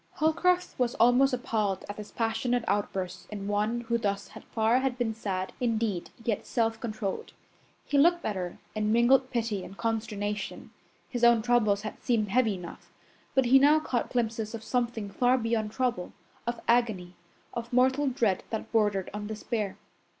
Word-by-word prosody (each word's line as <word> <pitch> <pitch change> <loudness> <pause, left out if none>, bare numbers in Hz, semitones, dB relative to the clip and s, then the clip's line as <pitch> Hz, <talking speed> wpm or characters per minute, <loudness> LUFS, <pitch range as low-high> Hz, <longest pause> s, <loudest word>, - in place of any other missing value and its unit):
Holcroft 355 +3 +1
was 245 -2 +1
almost 245 +4 +5
appalled 215 -6 -1
at 205 - -6
this 210 -1 -8
passionate 230 +1 0
outburst 190 -3 -2
in 200 -2 -6
one 210 +3 0
who 235 0 -1
thus 200 -2 -2 0.2
far 225 +2 +3
had 260 -2 -1
been 235 -3 0
sad, 190 -4 -3
indeed, 225 -6 -1 0.2
yet 220 -4 -1
self 225 -2 0
controlled. 215 -4 -4 0.5
He 285 - +2
looked 345 +3 +4
at 210 - -1
her 180 -2 -4 0.2
in 215 0 0
mingled 255 +3 +4
pity 225 -5 -1
and 195 - -10
consternation. 210 -2 -3 0.4
His 245 -2 -4
own 235 -2 +6
troubles 220 -4 +2
had 215 - -6
seemed 220 -4 +1
heavy 225 -1 +2
enough, 175 -2 -10 0.4
but 265 -1 +4
he 265 +3 +7
now 295 +3 +6
caught 250 -6 -2
glimpses 225 -2 -1
of 220 - -8
something 235 -4 -1
far 250 +5 +3
beyond 225 -3 -1
trouble 245 -7 -1 0.3
of 240 0 -2
agony, 220 -7 +2 0.4
of 235 +1 -5
mortal 260 +3 +3
dread 235 -7 +1
that 220 - -4
bordered 205 -4 +1
on 210 0 -5
despair. 215 -1 -3
225 Hz, 165 wpm, -28 LUFS, 205-245 Hz, 0.5 s, he